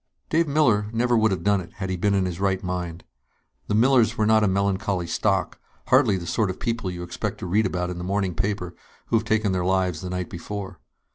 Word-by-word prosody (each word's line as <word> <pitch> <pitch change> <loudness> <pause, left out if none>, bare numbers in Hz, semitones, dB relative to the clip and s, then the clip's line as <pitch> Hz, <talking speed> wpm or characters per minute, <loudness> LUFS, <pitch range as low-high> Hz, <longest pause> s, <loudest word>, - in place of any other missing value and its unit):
_ - - -42
Dave 165 +1 +2
Miller 125 -9 +3
would - - -10
never 120 +1 +2
have 95 - -2
done 100 -1 +2
it, 85 - -12
had 95 -1 -4
he - - 0
been 100 +3 +1
in 95 -1 +2
his 90 -1 -4
right 95 0 0
mind. 90 -2 -4 0.6
The 105 - 0
Millers 120 -1 +4
were 110 - +2
not 110 0 +4
a - - +4
melancholy 95 -1 0
stock, 85 - 0 0.3
hardly 100 - +4
the 85 - -6
sort 105 +3 0
of 95 - -5
people 115 -5 -2
you 90 -1 -5
expect 85 0 -4
to - - -6
read 105 +5 +2
about 90 0 -2
in 90 - -6
the - - -5
morning 95 0 -1
paper 90 0 -2 0.4
who 115 - +4
have 110 - -2
taken 110 -2 +1
their 90 -1 0
lives 90 -3 0
the 90 - -5
night 90 -1 -4
before. 95 +1 -6
95 Hz, 235 wpm, -24 LUFS, 90-105 Hz, 0.6 s, Millers